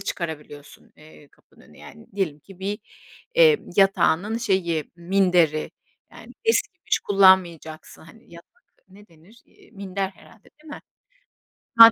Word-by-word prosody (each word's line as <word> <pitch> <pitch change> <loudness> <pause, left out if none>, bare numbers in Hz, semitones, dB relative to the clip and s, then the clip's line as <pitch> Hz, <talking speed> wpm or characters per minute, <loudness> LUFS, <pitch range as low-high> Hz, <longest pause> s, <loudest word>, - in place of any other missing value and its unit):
çıkarabiliyorsun, 155 -6 -8
eee, 150 -1 -18
kapının - - -27
önüne - - -20
yani. 75 - -14
Diyelim 165 -7 -2
ki 185 +5 -17
bir, 200 +3 -4 0.6
eee, 475 -3 +6 0.2
yatağının 195 +2 +2
şeyi, 175 - -1
minderi, 175 -3 +1 0.4
yani - - -14
eskimiş 390 -5 0
kullanmayacaksın. 185 -5 +2
Hani, 170 +3 -19
yatak 170 - -15 0.4
ne 205 +2 -18
denir? 170 +8 -22
Eee, - - -24
minder 195 -2 -4
herhâlde, 210 +2 -21 0.2
değil 310 - -14
mi? - - -11 1.0
Ha. 230 0 +11
190 Hz, 125 wpm, -23 LUFS, 160-205 Hz, 1.0 s, Ha